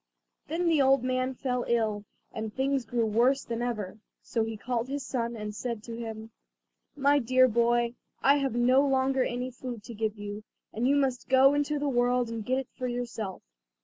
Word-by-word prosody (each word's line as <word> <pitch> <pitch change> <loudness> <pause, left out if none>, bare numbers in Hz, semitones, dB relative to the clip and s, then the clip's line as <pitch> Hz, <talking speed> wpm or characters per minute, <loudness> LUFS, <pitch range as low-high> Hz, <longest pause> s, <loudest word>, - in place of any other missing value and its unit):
Then 340 +3 -1
the 320 -4 +4
old 270 -1 +4
man 255 0 -1
fell 250 -2 -1
ill, 215 -3 0 0.3
and 220 -1 -5
things 265 +1 0
grew 230 +1 0
worse 240 +6 +2
than 235 0 -4
ever, 215 -4 -3 0.2
so 230 - -1
he 225 0 -4
called 240 +1 -2
his 280 0 -4
son 235 -2 -2
and 210 -1 -5
said 230 0 -4
to 230 0 -7
him: 225 -1 -7 0.6
"My 285 0 +3
dear 255 +1 +4
boy, 235 0 +2 0.3
I 280 +2 +5
have 270 -4 -1
no 250 +3 +4
longer 265 -1 +2
any 250 +1 -3
food 245 -3 -7
to 235 - -9
give 220 0 -2
you, 205 +1 -6 0.3
and 235 +3 0
you 280 - +4
must 265 -3 0
go 265 +1 +6
into 290 +1 0
the 290 0 -1
world 245 -2 +2
and 230 -1 -4
get 255 +4 0
it 265 -2 -3
for 255 - -3
yourself. 235 -5 -4
245 Hz, 195 wpm, -28 LUFS, 225-265 Hz, 0.6 s, go